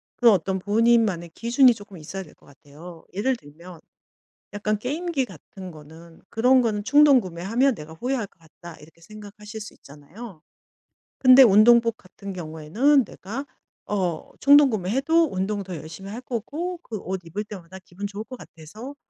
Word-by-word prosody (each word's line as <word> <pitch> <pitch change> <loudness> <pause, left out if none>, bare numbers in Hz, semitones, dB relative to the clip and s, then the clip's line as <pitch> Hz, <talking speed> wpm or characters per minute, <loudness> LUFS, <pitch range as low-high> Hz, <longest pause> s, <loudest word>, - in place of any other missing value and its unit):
그런 235 -4 +5
어떤 190 +2 -2
본인만의 210 -4 +2
기준이 245 +2 +4
쪼끔 205 -4 -13
있어야 180 +5 -7
될 170 - -14
것 - - -26
같아요. 160 +4 -14
예를 255 +7 0
들면 170 0 -14 0.7
약간 210 +1 -2
게임기 290 +3 -2
같은 190 -6 -12
거는 160 +2 -15
그런 250 +3 +3
거는 210 -3 -1
'충동 290 -2 +6
구매하면 205 +9 0
내가 160 -3 -11
후회할 245 +3 -2
것 185 - -34
같다.' 165 +1 -14
이렇게 160 +2 -18
생각하실 210 +2 -11
수 210 - -10
있잖아요. 160 +6 -13 0.8
근데 255 +1 +9
운동복 230 +2 +5
같은 195 +1 -10
경우에는 180 - +1
내가 235 +9 -7 0.4
어 180 -6 -3
충동구매해도 280 - +4
운동 195 +2 -2
더 185 -2 -7
열심히 160 +6 -9
할 225 +4 -6
거고 300 - -5
그 220 - -6
옷 190 0 -5
입을 190 +6 -5
때마다 190 -3 -11
기분 200 +3 -6
좋을 205 +2 -7
거 255 - -10
같아서 215 - -11
205 Hz, 340 characters per minute, -24 LUFS, 175-245 Hz, 0.8 s, 근데